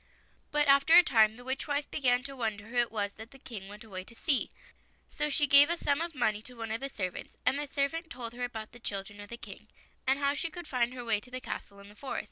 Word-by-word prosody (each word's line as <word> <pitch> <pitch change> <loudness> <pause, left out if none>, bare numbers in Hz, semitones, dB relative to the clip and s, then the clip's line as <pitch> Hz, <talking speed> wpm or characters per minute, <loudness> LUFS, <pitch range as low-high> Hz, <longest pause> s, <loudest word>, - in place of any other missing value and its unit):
But 295 0 +2
after 280 +4 +6
a 355 - +10
time 220 -7 +4
the 245 - -12
witch 265 +4 -3
wife 290 0 -1
began 250 -3 +2
to 275 0 -7
wonder 220 -5 -2
who 245 - -5
it 240 -1 +3
was 205 -2 -1
that 220 +1 -9
the 270 - -14
King 220 -7 -8
went 210 +3 -9
away 190 -4 -6
to 230 - -11
see, 275 +2 +2 0.6
so 300 - 0
she 295 +1 +3
gave 285 +2 +8
a 340 - +1
sum 285 -1 +1
of 335 -2 -3
money 215 -5 +1
to 250 +3 -9
one 225 -1 -4
of 225 - -1
the 275 - -2
servants, 185 -8 -5
and 275 - +3
the 295 - -3
seiwant 305 +4 -1
told 240 -7 -5
her 245 +1 -5
about 220 -3 -5
the 245 - -14
children 205 -2 -4
of 205 - -11
the 235 - -6
King, - - -10 0.4
and 265 +1 +4
how 280 0 +2
she 330 +3 -2
could 345 -1 -8
find 250 -1 0
her 245 -1 -6
way 220 -3 +2
to 240 - -15
the 255 0 -4
castle 200 -5 -6
in 200 0 -13
the 205 - -13
forest. 270 +4 -4
245 Hz, 275 wpm, -31 LUFS, 220-280 Hz, 0.6 s, a